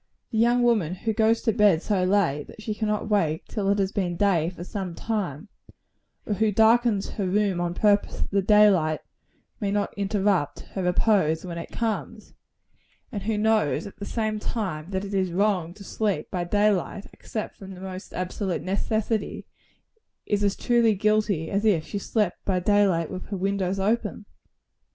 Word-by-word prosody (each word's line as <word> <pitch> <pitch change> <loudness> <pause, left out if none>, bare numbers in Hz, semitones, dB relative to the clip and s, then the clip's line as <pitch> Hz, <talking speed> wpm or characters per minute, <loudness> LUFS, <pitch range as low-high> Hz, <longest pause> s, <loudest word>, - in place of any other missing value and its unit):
The 220 - 0
young 240 +2 +4
woman 210 -8 +2
who 220 +4 -2
goes 225 +1 +2
to 225 - +2
bed 205 -6 +4
so 195 -4 +1
late 180 -7 +1
that - - -13
she 215 0 -3
cannot 210 0 -1
wake 165 -7 +1
till 200 -3 -2
it 200 - +3
has 195 -1 0
been 180 -4 -2
day 175 -5 +2
for 175 -1 -9
some 185 -2 -5
time 200 -6 -3 0.8
or 210 - -1
who 215 +1 +1
darkens 220 0 +3
her 200 -3 -2
room 195 -2 +1
on 175 0 -2
purpose 205 0 +2
that - - -3
the 200 0 +2
day 210 +2 +6
light 155 -4 0 0.6
may 205 -4 -1
not 205 0 -1
interrupt 200 -5 0
her 190 - -3
repose 180 -3 +2
when 170 -2 -5
it 165 - -7
comes 225 -2 -4 0.8
and 205 -4 -4
who 220 +1 -1
knows, 210 -9 +2
at 200 - -10
the 200 - -5
same 215 -1 -2
time, 185 -8 -3
that 190 0 -2
it 200 - -7
is 190 -2 0
wrong 185 -2 +1
to 205 - -11
sleep 200 -6 -2
by 175 -2 -2
day 205 +4 +3
light, 195 +1 -3
except 215 - -6
from 195 -1 -9
the - - -12
most 190 0 -7
absolute 185 0 -3
necessity 215 +2 -1 0.8
is 205 0 0
as 200 -1 +2
truly 235 -3 +3
guilty, 210 -5 +1
as 200 +1 0
if 195 -8 +2
she 205 - -4
slept 210 -2 -1
by 185 -2 0
day 205 +2 +4
light 165 -4 0
with 185 -1 -6
her 200 - -4
windows 195 0 -1
open. 210 +1 -1
200 Hz, 185 wpm, -25 LUFS, 180-215 Hz, 0.8 s, day